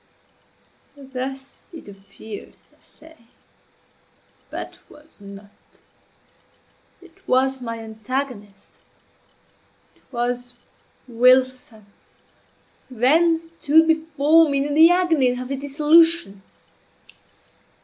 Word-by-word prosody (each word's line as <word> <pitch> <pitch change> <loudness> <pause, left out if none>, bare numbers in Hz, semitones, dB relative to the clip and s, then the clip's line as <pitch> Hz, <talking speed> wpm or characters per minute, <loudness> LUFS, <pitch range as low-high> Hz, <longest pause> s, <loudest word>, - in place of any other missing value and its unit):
Thus 270 0 -8
it 325 -9 -12
appeared, 200 +2 -12 0.2
I - - -35
say, 320 +1 -18 1.3
but - - -7
was 295 -6 -14
not. 200 0 -13 1.5
It 340 -2 -22
was 265 +1 +1
my 230 -2 -5
antagonist 220 -2 -7 1.1
it - - -31
was 245 0 -4 0.5
Wilson, 250 -2 +1 1.0
who 255 - -13
then 320 +8 +3
stood 325 -1 +1
before 320 0 +3
me 280 0 0
in 290 - -3
the 320 +3 +7
agonies 320 -9 +1
of 255 0 -7
his 275 -1 -4
dissolution. 300 - +2
265 Hz, 85 wpm, -21 LUFS, 240-315 Hz, 1.5 s, the